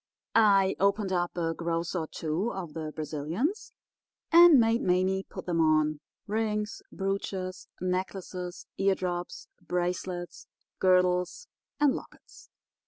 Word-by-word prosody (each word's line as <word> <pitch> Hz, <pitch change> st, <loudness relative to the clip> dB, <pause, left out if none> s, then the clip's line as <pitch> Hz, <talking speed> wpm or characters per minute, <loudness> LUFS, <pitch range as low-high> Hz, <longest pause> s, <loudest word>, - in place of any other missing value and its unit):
I 200 Hz, -4 st, +5 dB
opened 200 Hz, 0 st, +1 dB
up 175 Hz, 0 st, -1 dB
a 165 Hz, -1 st, 0 dB
gross 170 Hz, +1 st, -2 dB
or 165 Hz, -3 st, -2 dB
two 165 Hz, +11 st, -2 dB
of 175 Hz, -5 st, -6 dB
the 155 Hz, -2 st, -5 dB
Brazilians 160 Hz, -, -3 dB, 0.6 s
and 335 Hz, -4 st, +9 dB
made 230 Hz, +1 st, +3 dB
Mame 185 Hz, +1 st, +1 dB
put -, -, -8 dB
them 170 Hz, -2 st, +1 dB
on—rings, 205 Hz, +8 st, -1 dB
brooches, 190 Hz, -1 st, -3 dB
necklaces, 185 Hz, 0 st, -4 dB
eardrops, 185 Hz, -2 st, -1 dB
bracelets, 180 Hz, 0 st, -3 dB, 0.3 s
girdles, 180 Hz, -, +2 dB, 0.3 s
and 290 Hz, -2 st, +4 dB
lockets. -, -, -11 dB
185 Hz, 105 wpm, -29 LUFS, 175-200 Hz, 0.6 s, and